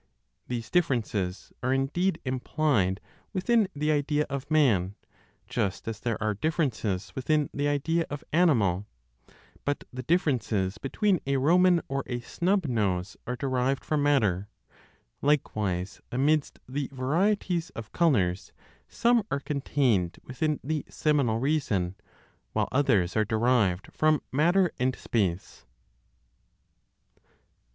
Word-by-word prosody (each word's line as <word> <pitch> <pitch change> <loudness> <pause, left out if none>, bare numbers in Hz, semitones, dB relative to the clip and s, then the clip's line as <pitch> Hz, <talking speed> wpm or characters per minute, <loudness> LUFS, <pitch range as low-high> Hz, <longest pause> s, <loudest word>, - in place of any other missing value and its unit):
These 120 -2 -4
differences 110 - 0
are 130 - 0
indeed 145 +8 +1
implied 130 -6 0 0.3
within 215 +2 +2
the 150 +1 +1
idea 150 0 +1
of 140 +1 -4
man, 110 - +3 0.5
just 95 +2 -2
as 110 -2 -4
there 115 -1 -1
are 110 -1 0
differences 120 - -1
within 150 +2 0
the 145 +1 0
idea 160 +4 0
of 145 0 -6
animal. 110 - +3 0.8
But 145 0 -1
the 130 - -4
differences 120 - 0
between 185 +7 +1
a 140 0 +2
Roman 175 +5 +4
or 135 0 -1
a 120 -1 -2
snub 180 +9 0
nose 100 -7 -1
are 125 - -2
derived 130 0 -1
from 150 -1 0
matter. 105 -10 +2 0.7
Likewise, 105 -10 0
amidst 145 +4 +1
the 135 +1 -3
varieties 170 +6 0
of 110 -1 -7
colors, 100 - +1 0.3
some 240 0 +3
are 140 - 0
contained 135 - 0
within 150 +4 -1
the 150 +1 -2
seminal 140 -7 +1
reason, 115 - 0 0.6
while - - 0
others 105 -10 +2
are 110 - +3
derived 110 -4 +1
from 155 -1 +2
matter 175 +6 +3
and 130 +1 +1
space. 95 -6 -2
135 Hz, 120 wpm, -27 LUFS, 110-155 Hz, 0.8 s, Roman